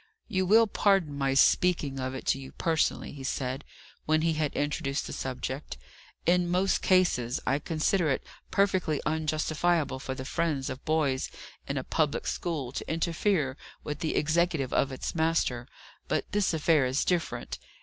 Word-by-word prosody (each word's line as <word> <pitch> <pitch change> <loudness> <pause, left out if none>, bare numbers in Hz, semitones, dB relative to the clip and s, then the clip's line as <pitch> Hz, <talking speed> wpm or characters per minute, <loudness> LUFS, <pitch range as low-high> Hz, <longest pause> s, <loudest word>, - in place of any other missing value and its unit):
"You 185 -1 0
will 225 +4 +7
pardon 195 -8 +2
my 135 -1 0
speaking 145 -2 +3
of 130 0 -3
it 130 - -7
to 135 - +2
you 135 -1 -10
personally," 160 -2 0
he 140 -2 -9
said, 130 +1 -2 0.4
when 155 0 +3
he 165 -1 +2
had 155 -2 0
introduced 145 -1 -1
the - - -6
subject, 130 - -4 0.5
"In 175 0 +3
most 185 +2 +2
cases 175 -10 +2
I 135 +2 +2
consider 160 +2 +1
it 135 - 0 0.3
perfectly 185 -6 +1
unjustifiable 155 -1 0
for 130 0 -4
the 130 - -6
friends 145 -4 -1
of 130 +1 -7
boys 150 -4 +1 0.4
in 140 - -2
a 130 - -1
public 150 0 0
school 150 -8 -2
to - - -5
interfere 165 -3 0 0.3
with 150 0 -4
the 160 - -1
executive 155 -3 +1
of 135 - +2
its 130 - -4
master; 160 -7 0 0.4
but - - -1
this 205 -1 +2
affair 155 -4 +3
is 130 +3 0
different. 175 -2 -1
155 Hz, 160 wpm, -29 LUFS, 135-170 Hz, 0.5 s, will